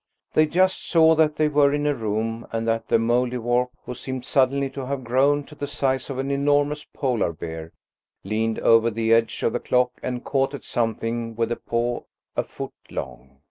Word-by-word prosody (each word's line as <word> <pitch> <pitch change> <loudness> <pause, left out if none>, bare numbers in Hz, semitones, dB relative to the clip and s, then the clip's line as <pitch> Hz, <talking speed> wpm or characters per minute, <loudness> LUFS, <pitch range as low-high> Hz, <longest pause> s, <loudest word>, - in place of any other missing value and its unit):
They 155 0 +4
just 185 +4 +2
saw 160 -1 +6
that 155 -1 +3
they 155 0 +2
were 145 -1 +4
in 145 0 0
a 145 - +3
room, 115 0 -2
and 115 0 -2
that 115 0 0
the - - +4
Mouldiwarp, 120 +1 +1 0.2
who 125 - -5
seemed 130 +1 -6
suddenly 135 +1 +2
to 135 -1 -6
have 135 -1 -3
grown 135 +4 +2
to 150 - -14
the 145 -1 -5
size 135 -2 -1
of 135 - -4
an 135 +1 -2
enormous 145 +1 +1
Polar 125 - -1
bear, 80 0 -7 0.5
leaned 110 +3 -1
over 115 0 +5
the 115 0 +1
edge 115 -1 +1
of 115 - +1
the 120 - 0
clock 125 0 +2
and 125 -1 -3
caught 135 0 0
at - - -9
something 115 0 -2
with 115 +1 -1
a - - +1
paw 120 +1 -2 0.3
a - - +1
foot - - -7 0.2
long. 65 +2 -7
125 Hz, 195 wpm, -24 LUFS, 115-140 Hz, 0.5 s, saw